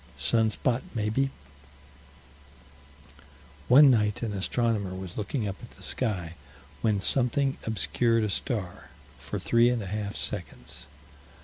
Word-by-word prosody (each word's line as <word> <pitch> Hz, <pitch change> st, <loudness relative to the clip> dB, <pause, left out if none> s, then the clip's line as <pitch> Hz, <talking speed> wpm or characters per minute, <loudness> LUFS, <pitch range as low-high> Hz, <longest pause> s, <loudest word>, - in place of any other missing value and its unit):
Sun 110 Hz, -, +2 dB
spot, 120 Hz, +3 st, 0 dB
maybe. 110 Hz, +5 st, +1 dB, 2.4 s
One 135 Hz, +2 st, +8 dB
night 105 Hz, -2 st, +1 dB
an 110 Hz, -3 st, -2 dB
astronomer 100 Hz, -1 st, 0 dB
was 95 Hz, -2 st, -7 dB
looking 110 Hz, +2 st, -2 dB
up 100 Hz, 0 st, -4 dB
at 115 Hz, -, -10 dB
the -, -, -12 dB
sky, 95 Hz, -9 st, -2 dB, 0.5 s
when 105 Hz, -3 st, +2 dB
something 135 Hz, +5 st, +1 dB
obscured 115 Hz, +2 st, +1 dB
a 105 Hz, -, 0 dB
star, 100 Hz, -6 st, -3 dB, 0.3 s
for -, -, -5 dB
three 120 Hz, +1 st, +4 dB
and 120 Hz, -3 st, 0 dB
a -, -, -6 dB
half 105 Hz, +1 st, -3 dB
seconds. 60 Hz, -, -6 dB
110 Hz, 125 wpm, -28 LUFS, 100-120 Hz, 2.4 s, One